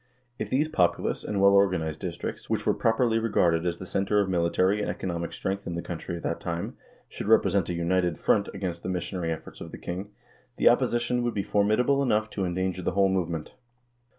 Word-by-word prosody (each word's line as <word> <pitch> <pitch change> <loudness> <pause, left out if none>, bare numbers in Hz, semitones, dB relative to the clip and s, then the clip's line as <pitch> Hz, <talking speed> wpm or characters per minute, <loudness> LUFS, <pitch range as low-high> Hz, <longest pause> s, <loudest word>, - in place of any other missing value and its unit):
If - - -3
these 145 +4 +2
populous 90 - +1
and 105 - -2
well 100 0 +6
organized 90 -6 +2
districts, 85 -2 -5
which - - -1
were - - +3
properly 115 0 +2
regarded 90 -7 +2
as 85 -1 -1
the 95 - -8
center 100 +3 +1
of 100 - +2
military 90 +3 +2
and - - -2
economic 85 -2 -3
strength 100 +1 -3
in 85 - -3
the 85 - -4
country 85 0 -5
at 85 - -10
that 85 - -2
time, 85 0 -4 0.3
should - - -7
present - - +3
a 90 - -1
united 85 -1 +1
front 100 - +2
against 90 -3 -4
the 90 - -4
missionary 90 -1 -2
efforts 80 - -7
of - - -7
the - - -7
king, 95 +4 -5 0.5
the - - +6
opposition 120 +1 +1
would 120 -1 -1
be 100 - 0
formidable 110 +8 +2
enough 110 -5 +1
to 95 - -2
endanger 95 +1 -2
the 90 - -1
whole 100 0 +3
movement. 85 -4 -2
95 Hz, 205 wpm, -27 LUFS, 85-105 Hz, 0.5 s, well